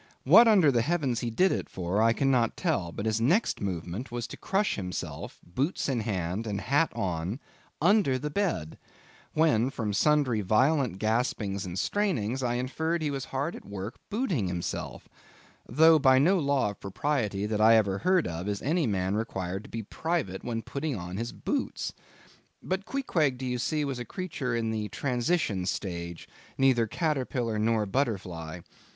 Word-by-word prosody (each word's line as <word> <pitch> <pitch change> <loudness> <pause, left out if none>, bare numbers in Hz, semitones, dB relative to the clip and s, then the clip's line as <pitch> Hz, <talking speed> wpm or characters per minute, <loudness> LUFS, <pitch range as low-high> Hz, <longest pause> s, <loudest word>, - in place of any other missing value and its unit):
What 210 - +8
under 190 -10 +6
the 120 -3 +2
heavens 140 -4 0
he 120 - -2
did 185 +12 +3
it - - -2
for, 95 +3 -1
I 115 +1 +5
cannot 125 -1 +1
tell, 150 - 0
but 100 - -5
his 110 0 0
next 175 - +2
movement 95 +5 -4
was 120 -1 -3
to - - -7
crush 200 +1 0
himself—boots 95 - -4
in 130 -4 0
hand, 100 0 -2
and 100 -2 -2
hat 145 +8 +2
on—under 120 - 0
the 150 +3 -4
bed; 150 - -2 0.5
when, 145 -7 +3
from 110 -6 -3
sundry 130 -1 +3
violent 125 - +2
gaspings 110 -3 -1
and 90 +1 -5
strainings, 135 - 0
I 120 -1 0
inferred 160 +7 -1
he 150 - 0
was 135 -2 -3
hard 140 +5 -3
at - - -10
work 100 +2 -6
booting 200 - 0
himself; 90 -1 -4 0.6
though 160 +5 +6
by 130 -2 +5
no 175 +8 +4
law 140 -7 +1
of 100 - -14
propriety 105 -2 -1
that 105 0 -1
I 115 +1 +7
ever 100 -3 +2
heard 185 -1 +3
of, 85 +3 -4
is 100 -1 -2
any 155 +1 +1
man 95 -2 0
required 95 -3 -3
to - - -12
be 115 -1 -5
private 130 - -2
when 115 -2 -3
putting 140 0 -3
on 90 -1 -6
his 120 +2 -3
boots. 285 -2 -3 0.7
But 190 +3 -3
Queequeg, 160 - 0
do 130 - -5
you 125 -1 -2
see, 150 +4 0
was 135 -3 -3
a 120 - -5
creature 155 - -3
in 115 -1 -1
the 105 -1 -3
transition 120 - 0
stage—neither 95 +7 -1
caterpillar 130 -6 -1
nor 110 0 +2
butterfly. 95 - -2
120 Hz, 165 wpm, -28 LUFS, 100-150 Hz, 0.7 s, What